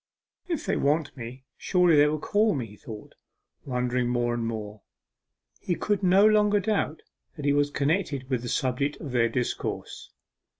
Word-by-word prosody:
'If 335 -5 -3
they - - 0
want 145 +1 0
me, 125 +1 -8
surely 180 -3 +3
they 145 0 +6
will 155 +1 0
call 210 +5 +1
me,' 130 -4 -2
he 105 -1 -13
thought, 105 -1 -10 0.5
wondering 125 -1 -1
more 120 -1 0
and 120 -1 -2
more. 110 -2 -5 0.8
He 175 - -1
could 205 +1 -1
no 190 +2 +5
longer 210 -1 +4
doubt 200 -6 -1 0.3
that 150 -4 -6
he 145 - +3
was 145 0 +2
connected 145 -2 -1
with 130 -3 -1
the 120 - -5
subject 135 +4 0
of 145 - -7
their 120 -2 +2
discourse. 125 0 -4
140 Hz, 170 wpm, -26 LUFS, 120-180 Hz, 0.8 s, they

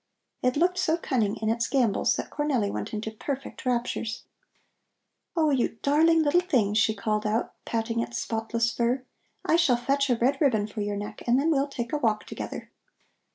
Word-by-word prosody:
It 255 +2 +1
looked 360 +3 +2
so 320 +1 +2
cunning 230 -11 0
in 220 - -2
its 230 0 0
gambols 245 -6 +2
that - - -5
Cornelli 265 -9 0
went - - -4
into 220 0 -4
perfect 270 +4 -5
raptures. 235 -2 -1 1.1
"Oh, 310 -2 +3
you 250 -4 0
darling 320 +3 +4
little 300 +4 +4
thing!" 250 - +1
she 220 0 +3
called 215 0 -1
out, 215 +2 -1
patting 230 0 -1
its 235 +1 -3
spotless 230 +1 -1
fur; 245 +3 0 0.4
"I 325 - +4
shall 300 -8 +4
fetch 275 +3 0
a 245 - +4
red 265 +5 +1
ribbon 225 -8 +3
for 210 0 -6
your 205 0 -2
neck 205 +1 -6
and 245 +2 +4
then 315 +4 +2
we'll 280 -2 +2
take 240 -3 -5
a 300 - +1
walk 220 -5 0
together." - - -7
240 Hz, 185 wpm, -27 LUFS, 220-285 Hz, 1.1 s, darling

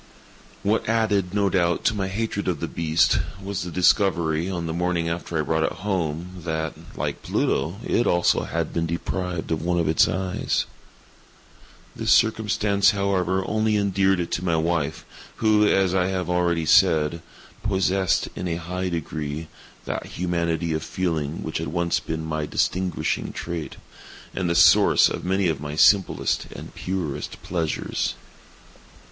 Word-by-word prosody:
What 105 +2 +1
added, 105 -5 +1
no 100 0 +1
doubt, 85 -3 +1
to - - +3
my 95 -2 -1
hatred 100 +1 -3
of 85 -5 0
the - - -3
beast, 80 0 +2 0.2
was 100 -1 -4
the 90 - -4
discovery, 85 -2 +2
on 85 -3 -3
the 80 - -3
morning 85 -1 0
after 85 0 -3
I 75 - +1
brought 80 +1 0
it - - +1
home, 90 -2 -3
that, 80 -2 -2 0.2
like - - -3
Pluto, 80 +7 0
it 120 - +1
also 85 0 +2
had - - -3
been 85 0 0
deprived 85 +1 -3
of 80 - 0
one 85 +1 0
of 85 - +1
its 80 0 +4
eyes. 95 -1 -1 1.3
This - - 0
circumstance, 105 -2 +3
however, 95 -2 0
only 110 0 +1
endeared 95 -1 +2
it 85 - -3
to 85 - -2
my 85 -3 +1
wife, 80 -1 -1 0.3
who, 105 -1 +3
as 95 -3 +3
I 90 -1 +2
have 90 -2 -2
already 85 -2 +1
said, 80 +1 +4 0.4
possessed, 95 -3 +1
in 90 - -4
a 85 - -1
high 90 +2 -3
degree, 80 -2 -4 0.4
that - - -4
humanity 85 -2 -1
of 80 - -1
feeling 80 -4 -2
which 80 - -3
had 80 - -3
once 85 +2 0
been 80 0 -4
my 75 -1 -2
distinguishing 90 +3 -1
trait, 85 -2 -5 0.6
and 90 -2 -1
the 85 - +1
source 90 +4 +6
of - - -5
many 95 +1 +1
of 80 -4 -1
my 75 0 -5
simplest 95 +5 +3
and - - -9
purest 90 -6 -4
pleasures. 85 -3 -2
90 Hz, 155 wpm, -24 LUFS, 80-95 Hz, 1.3 s, source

